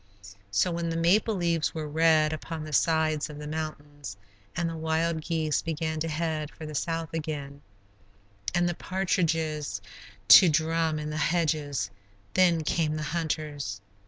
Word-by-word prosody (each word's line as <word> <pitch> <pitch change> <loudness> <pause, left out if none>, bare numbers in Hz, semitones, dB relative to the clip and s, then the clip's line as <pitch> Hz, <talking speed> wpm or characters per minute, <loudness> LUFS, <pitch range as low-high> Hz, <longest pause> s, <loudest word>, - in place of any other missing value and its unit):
So 100 - +2
when 170 0 -2
the 165 - -2
maple 200 +6 +3
leaves 170 -4 0
were 155 -1 -3
red 155 0 +3
upon 160 0 -5
the 155 -1 -7
sides 155 0 +2
of 150 - -8
the 150 - -7
mountains 145 -6 -6 0.4
and 170 0 0
the 165 - -4
wild 160 0 0
geese 155 -2 0
began 160 -1 -2
to 165 - -1
head 155 -1 -2
for 155 - -10
the 155 - -7
south 165 +3 -2
again, 145 -3 -4 0.9
and 175 0 +2
the 175 - 0
partridges 165 - -1 0.5
to 180 - +10
drum 160 +1 +1
in 150 0 -4
the 155 - -3
hedges, 150 - 0 0.4
then 175 -3 +4
came 155 0 0
the 155 - -3
hunters. 150 -10 -3
160 Hz, 155 wpm, -28 LUFS, 150-165 Hz, 0.9 s, to